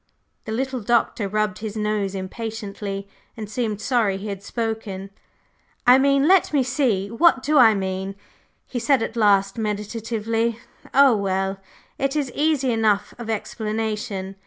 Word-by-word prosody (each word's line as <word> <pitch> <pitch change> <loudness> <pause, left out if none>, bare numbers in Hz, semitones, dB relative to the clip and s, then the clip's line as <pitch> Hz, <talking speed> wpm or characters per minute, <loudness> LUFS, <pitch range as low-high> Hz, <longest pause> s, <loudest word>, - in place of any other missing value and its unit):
The 220 - -5
little 260 +3 -2
Doctor 230 -2 +1
rubbed 215 -1 -1
his 215 -1 -5
nose 210 -2 -1
impatiently 200 0 -5 0.3
and 215 -2 -5
seemed 215 -1 -2
sorry 220 -6 +1
he 205 +2 -6
had 200 -1 -5
spoken. 210 -3 -4 0.7
"I 250 +2 +7
mean 275 +1 +3
let 380 0 +4
me 285 -3 +3
see! 245 -7 0
What 260 +1 +4
do 300 -1 +3
I 225 -3 +7
mean?" 190 0 -3 0.5
he 245 - -4
said 245 0 +2
at 225 - -5
last 200 -2 +3
meditatively 225 +2 -2 0.3
"Oh, 275 -3 +6
well, 195 -1 -1 0.4
it 275 +1 0
is 285 -4 -1
easy 290 -4 +1
enough 215 -3 +1
of 230 -2 -6
explanation. 210 -3 -3
220 Hz, 145 wpm, -23 LUFS, 200-245 Hz, 0.7 s, I